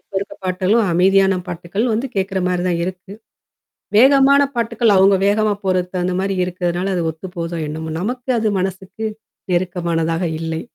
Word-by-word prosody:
இப்ப - - -48
இருக்குற 200 - -7
பாட்டுகளும், 185 +5 +1
அமைதியான 190 +2 +3
பாட்டுக்கள் 180 +7 -2
வந்து 235 +5 -1
கேட்கற 190 0 -1
மாரி 180 -1 -1
தான் 170 -1 0
இருக்கு. 185 +1 -7 0.9
வேகமான 275 +3 +6
பாட்டுக்கள் 230 -2 +1
அவங்க 195 +1 +5
வேகமா 210 +1 +2
போறது 185 0 0
அந்த 180 - -1
மாரி 195 +1 -1
இருக்கிறதுனால 180 +1 -2
அது 175 - 0
ஒத்து 160 +4 -7
போதோ 170 0 -4
என்னமோ. 160 +1 -5
நமக்கு 245 +6 -4
அது 220 - 0
மனசுக்கு 190 +3 -4 0.5
நெருக்கமானதாக 170 -1 -1 0.2
இல்லை. 160 0 -3
190 Hz, 150 wpm, -19 LUFS, 175-210 Hz, 0.9 s, வேகமான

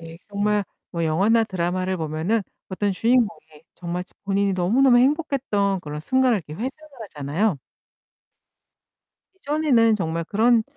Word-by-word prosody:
네. 165 0 -11
정말 205 0 0 0.3
뭐 170 -1 -2
영화나 200 +9 +3
드라마를 185 -1 -2
보면은 160 +7 -1 0.3
어떤 200 +1 -1
주인공이 215 -8 0
정말 175 0 -4
저 - - -31
본인이 200 0 +1
너무너무 240 +8 +4
행복했던 250 - +1
그런 150 -2 -6
순간을 255 +6 +2
이렇게 150 -4 -10
회상을 240 +10 -3 0.3
하잖아요. 160 +2 -1 1.8
예전에는 285 - +2
정말 165 -3 -2
그런 225 +5 +3
200 Hz, 320 characters per minute, -23 LUFS, 170-230 Hz, 1.8 s, 너무너무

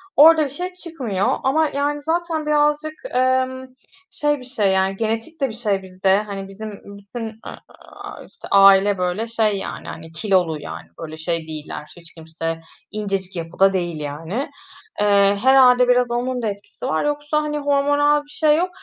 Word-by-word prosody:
orada 315 +1 +7
bir 280 - -3
şey 360 +6 -5
çıkmıyor. 265 - -3 0.2
Ama, 310 +4 +2
yani, 290 +1 -2
zaten, 325 0 -1
birazcık, 300 +1 +1 0.2
emm, 260 0 +1 0.4
şey 295 -1 0
bir 255 - -11
şey, 215 -6 +1
yani, 190 0 +1
genetik 225 +9 -3
de 270 - +3
bir - - -7
şey 210 -4 0
bizde. 190 +1 +1
Hani, 200 -2 -6
bizim 210 +2 -8
bütün, 200 +3 -8
eee, 220 - -9 0.5
aaa, - - -11
işte, - - -12
aile 195 0 +6
böyle 180 +5 -1
şey, 220 -3 +1
yani, 195 - -6
hani, 160 0 -9
kilolu, 165 -2 +1
yani, 80 - -8
böyle 155 -1 -7
şey 165 0 -3
değiller, 150 -1 -7
hiç 170 -2 -14
kimse 165 0 -5 0.3
incecik 195 -3 -2
yapıda 175 +3 +1
değil, 175 -4 -2
yani. 160 - -4 0.5
Eee, 200 -1 +4
herhâlde, 250 -2 +6
biraz 250 -1 +3
onun 245 +1 -1
da 225 - -1
etkisi 200 -1 -7
var. 155 - 0
Yoksa, 295 +1 0
hani, 300 0 -3
hormonal 290 +1 +2
bir 290 - -24
şey 300 0 +2
yok. 360 +2 0
220 Hz, 170 wpm, -21 LUFS, 190-290 Hz, 0.5 s, orada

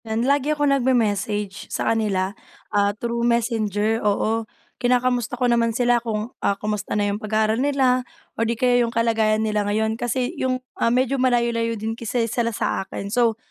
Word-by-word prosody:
Yan 225 +2 -1
lagi 280 +1 +2
akong 290 -2 +2
nagme-message 210 -6 0
sa - - 0
kanila, 200 -4 0 0.4
ah, 200 0 +3
through 235 +1 -2
messenger, 225 -2 +1
oo. 215 +2 0 0.3
Kinakamusta 250 0 +1
ko 250 - +1
naman 235 -1 +2
sila 245 -1 +3
kung, 225 0 -3
ah, 200 - +1
kamusta 210 -1 -3
na 205 - +1
yung 205 - -5
pag-aaral 215 +2 +1
nila, 265 -3 +2 0.3
or 230 0 -1
'di 235 - -1
kaya 245 0 +3
'yong 235 - +1
kalagayan 220 -2 +1
nila 210 -1 0
ngayon 215 +2 0
kasi 245 +1 -1
'yong, 255 -1 +1 0.2
ah, - - +4
medyo 255 +2 +1
malayo-layo 235 -2 +1
din 220 +2 -3
kasi 230 +1 -1
sila 230 +1 -1
sa 225 - -1
akin 200 +1 -6
so, 230 -3 +2
230 Hz, 175 wpm, -22 LUFS, 215-245 Hz, 0.4 s, ah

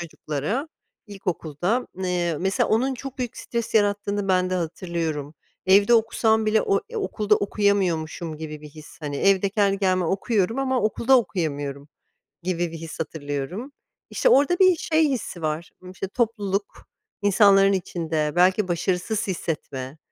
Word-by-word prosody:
çocuklara 170 - -3 0.4
ilkokulda. 190 - -2 0.2
Eee, 175 -2 0
mesela 190 +1 +1
onun 255 +5 +2
çok 270 +1 -8
büyük 245 -2 -4
stres 235 -1 -4
yarattığını 205 -1 +1
bende 185 0 +2
hatırlıyorum. 165 -3 -3 0.3
Evde 200 +4 +6
okusam 220 -1 +2
bile 215 0 +3
o, 195 - +1
eee, 470 - -8
okulda 215 - +1
okuyamıyormuşum 180 -6 0
gibi 155 -1 -7
bir 150 - -10
his, 155 0 -14
hani, 145 -2 -4
evde 195 +3 +3
kendi 200 -1 +2
kendime 185 -2 +1
okuyorum 200 +4 0
ama 260 -2 +1
okulda 235 +4 +3
okuyamıyorum 145 - -3 0.5
gibi 175 -2 -1
bir 165 - -6
his 160 0 -8
hatırlıyorum. 160 - -4 0.4
İşte - - +2
orada 350 - +4
bir 370 -2 +6
şey 315 -1 +2
hissi 225 - -4
var, 155 +2 -2 0.2
işte, 190 +1 -5
topluluk, 205 -3 -2 0.4
insanların 200 -1 +5
içinde 165 -5 -1
belki 185 +2 +4
başarısız 180 +5 -1
hissetme, 150 -6 -4
190 Hz, 135 wpm, -24 LUFS, 165-220 Hz, 0.5 s, Evde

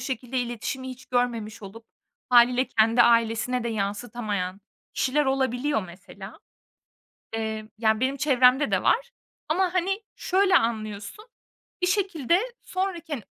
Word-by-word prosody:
şekilde 260 -1 -3
iletişimi 245 +2 -4
hiç 255 0 -10
görmemiş 230 -3 -2
olup 225 +3 -11 0.4
hâliyle 250 +1 +5
kendi 225 +2 +4
ailesine 230 +1 +2
de 235 - -1
yansıtamayan 205 -2 -3 0.3
kişiler 290 +3 +1
olabiliyor 265 -1 0
mesela. 195 +3 -12 0.9
Emm, 220 -1 -4
yani 220 -1 +2
benim 265 +2 0
çevremde 265 -1 +4
de - - +1
var 485 +1 +2 0.4
ama, 365 +3 +1
hani, 390 +4 0
şöyle 380 0 +3
anlıyorsun 215 - -2 0.6
bir - - +3
şekilde 360 - +1 0.2
sonraki, 370 -4 -4
hani 245 -7 -3
245 Hz, 120 wpm, -25 LUFS, 220-295 Hz, 0.9 s, hâliyle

